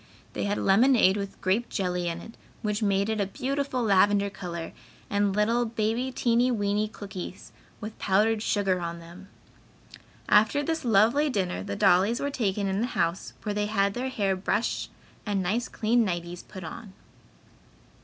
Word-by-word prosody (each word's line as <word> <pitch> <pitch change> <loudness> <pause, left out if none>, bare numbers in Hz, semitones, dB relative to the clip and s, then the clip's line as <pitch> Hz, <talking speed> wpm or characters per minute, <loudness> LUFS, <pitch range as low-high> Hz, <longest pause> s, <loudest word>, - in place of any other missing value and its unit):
They - - -2
had 205 0 0
lemonade 210 -1 +4
with 200 -1 -5
grape 200 +6 +1
jelly 180 -2 -1
in 170 0 -3
it, 225 - -11 0.3
which 210 0 -1
made 200 -1 +2
it 220 -1 -1
a 200 - 0
beautiful 265 +3 -2
lavender 200 -1 +3
color, 170 -3 -6 0.4
and 200 -1 +1
little 230 +3 +2
"Baby 230 +3 -1
teeny 240 0 +2
weeny 210 -2 0
cookies" 195 -4 -8 0.3
with 215 +1 -8
powdered 210 +3 +2
sugar 195 -4 +1
on 170 0 -4
them. 170 +3 -12 1.0
After 220 +7 +4
this 320 +2 -2
lovely 235 +6 +4
dinner, 185 - -1
the 100 - -4
dollies 195 - +3
were 285 - -2
taken 205 -6 -1
in 195 +1 0
the 240 - 0
house, 170 +3 -1
where 210 - -2
they 210 0 -1
had 200 -2 +1
their 255 +3 -3
hair 200 -6 0
brushed 205 +4 -1 0.3
and 200 -3 -1
nice 220 +7 0
clean 230 +2 +1
nighties 175 -2 -3
put 190 -3 -10
on. 190 +5 -8
205 Hz, 165 wpm, -27 LUFS, 190-230 Hz, 1.0 s, lemonade